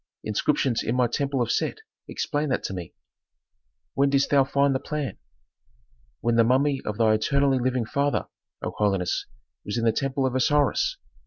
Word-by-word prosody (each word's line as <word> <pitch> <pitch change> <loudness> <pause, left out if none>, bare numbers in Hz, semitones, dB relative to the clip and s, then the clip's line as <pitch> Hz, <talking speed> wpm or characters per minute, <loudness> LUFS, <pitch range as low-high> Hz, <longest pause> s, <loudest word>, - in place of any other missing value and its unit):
"Inscriptions 120 +3 0
in 115 - -1
my 125 -1 +3
temple 135 +2 0
of 115 - -2
Set - - 0 0.3
explained 145 -2 -2
that - - 0
to - - -4
me." 90 -3 -7 1.0
"When 140 +1 +2
didst 140 0 +1
thou 140 -2 +5
find 140 +1 +2
the 130 - 0
plan?" 145 -5 -4 1.0
"When 115 0 +1
the 115 - +6
mummy 135 +3 +2
of 105 -1 -3
thy 110 -2 +4
eternally 135 +5 +2
living 125 -1 0
father, 140 +4 0 0.4
O - - -2
holiness, 95 -4 0 0.4
was 105 - -4
in 115 - 0
the 115 - +5
temple 135 +3 -1
of 130 - 0
Osiris. 145 - +2
130 Hz, 170 wpm, -25 LUFS, 115-140 Hz, 1.0 s, the